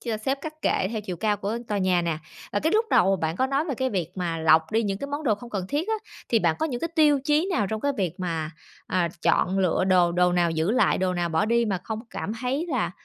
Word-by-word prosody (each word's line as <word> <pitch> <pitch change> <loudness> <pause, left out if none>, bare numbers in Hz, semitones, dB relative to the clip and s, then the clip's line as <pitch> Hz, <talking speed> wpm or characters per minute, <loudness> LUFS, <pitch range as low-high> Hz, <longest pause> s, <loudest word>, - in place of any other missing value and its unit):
chia 230 -3 -2
xếp 270 +5 -1
các 315 0 -8
kệ 190 - +1
theo 220 - -2
chiều 185 -4 -5
cao 210 +3 0
của 205 +3 -3
tòa 205 -1 0
nhà 185 -2 +2
nè. 165 -2 -1 0.3
À, 205 - -1
cái 320 - +1
lúc 440 +2 +3
đầu 195 +2 +4
bạn 160 -1 -2
có 260 - +2
nói 275 +3 0
về 285 -6 -2
cái 260 +2 -1
việc 180 -6 -1
mà 170 -3 -2
lọc 160 0 +4
đi 225 +1 +2
những 195 -2 -2
cái 280 - -4
món 290 +2 -4
đồ 215 -5 +3
không 235 +3 -11
cần 190 -4 -3
thiết 315 +8 -1
á, 445 - +2 0.3
thì 230 - +3
bạn 170 -5 +1
có 315 - +1
những 245 -5 -4
cái 330 - -1
tiêu 295 -3 +5
chí 305 +4 +2
nào 210 - +1
trong 220 +2 -3
cái 285 +3 0
việc 180 -5 -1
mà, 165 -3 -2 0.4
à, 180 -2 +1
chọn 190 +2 +2
lựa 185 -1 +2
đồ, 180 -2 +4
đồ 180 0 +3
nào 175 -1 +2
giữ 160 +4 0
lại, 250 +2 +3
đồ 185 -1 0
nào 175 -1 -1
bỏ 160 +4 +1
đi 235 +2 +2
mà 195 -5 -1
không 220 -1 -4
cảm 210 - -4
thấy 270 +7 -1
là, 255 - 0
205 Hz, 280 wpm, -25 LUFS, 180-260 Hz, 0.4 s, tiêu